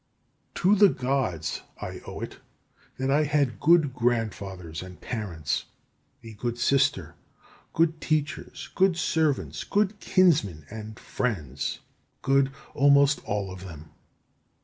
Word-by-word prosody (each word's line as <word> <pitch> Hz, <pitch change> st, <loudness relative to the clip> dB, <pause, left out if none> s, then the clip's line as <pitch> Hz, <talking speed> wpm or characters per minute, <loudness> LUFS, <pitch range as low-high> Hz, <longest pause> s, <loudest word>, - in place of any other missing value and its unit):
17. -, -, -6 dB
To 195 Hz, +2 st, +5 dB
the -, -, +1 dB
Gods 125 Hz, -, -1 dB, 0.2 s
I -, -, -6 dB
owe -, -, -7 dB
it -, -, -7 dB, 0.6 s
that 130 Hz, +1 st, 0 dB
I 145 Hz, +2 st, +4 dB
had 145 Hz, -4 st, +1 dB
good 160 Hz, -4 st, +4 dB
grandfathers 100 Hz, -9 st, -2 dB
and 90 Hz, -1 st, -10 dB
parents, 90 Hz, -, -3 dB, 0.6 s
a 115 Hz, -1 st, -9 dB
good 120 Hz, +3 st, -3 dB
sister, 135 Hz, +3 st, +2 dB, 0.6 s
good 165 Hz, -1 st, +1 dB
teachers, 155 Hz, 0 st, -2 dB
good 190 Hz, -2 st, +3 dB
servants, 140 Hz, -, 0 dB
good 205 Hz, 0 st, 0 dB
kinsmen, 145 Hz, -, +2 dB
and 110 Hz, 0 st, -8 dB
friends, 75 Hz, -, -3 dB, 0.4 s
good 135 Hz, 0 st, +3 dB, 0.2 s
almost 140 Hz, 0 st, +4 dB
all 100 Hz, -2 st, -2 dB
of 95 Hz, 0 st, -9 dB
them. 80 Hz, -4 st, -10 dB
125 Hz, 125 wpm, -26 LUFS, 95-150 Hz, 0.6 s, To